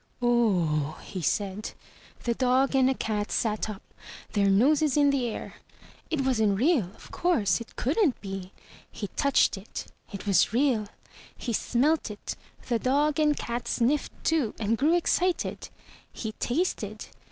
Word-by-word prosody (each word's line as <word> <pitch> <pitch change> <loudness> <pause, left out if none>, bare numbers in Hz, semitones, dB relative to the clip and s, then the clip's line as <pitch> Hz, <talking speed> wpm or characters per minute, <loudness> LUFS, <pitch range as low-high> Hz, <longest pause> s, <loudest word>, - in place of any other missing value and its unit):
"Oh 180 - +1
h - - -14
h!'' - - -12
he 185 - -3
said. 200 +5 -2 0.5
The 235 - +1
dog 260 +2 +2
and 265 -1 +4
the 265 - +1
cat 210 -3 -2
sat 215 -2 0
up, 205 -2 -7 0.5
their 200 -1 +3
noses 280 +8 +3
in 285 -1 +5
the 265 -3 0
air. 225 - -6 0.5
It 315 -4 0
wasn't 220 -7 +2
real, 270 - +3
of - - -15
course. 230 - +1
It 230 - -11
couldn't 295 - +1
be. 195 -2 -6 0.4
He 205 - -5
touched 280 -6 +2
it. 195 - -7 0.3
It 200 -1 -7
was 200 0 +3
real. 240 -4 +2 0.5
He 235 - -3
smelt 270 +7 +1
it. 210 -1 -6 0.3
The 235 -2 +1
dog 285 +4 +1
and 300 -1 +3
cat 235 0 -4
sniffed 265 +5 0
too 305 -9 +1
and 220 +1 +1
grew 300 +8 +3
excited. 355 +1 0 0.4
He 220 - -5
tasted. 300 +11 -2
240 Hz, 155 wpm, -27 LUFS, 205-280 Hz, 0.5 s, in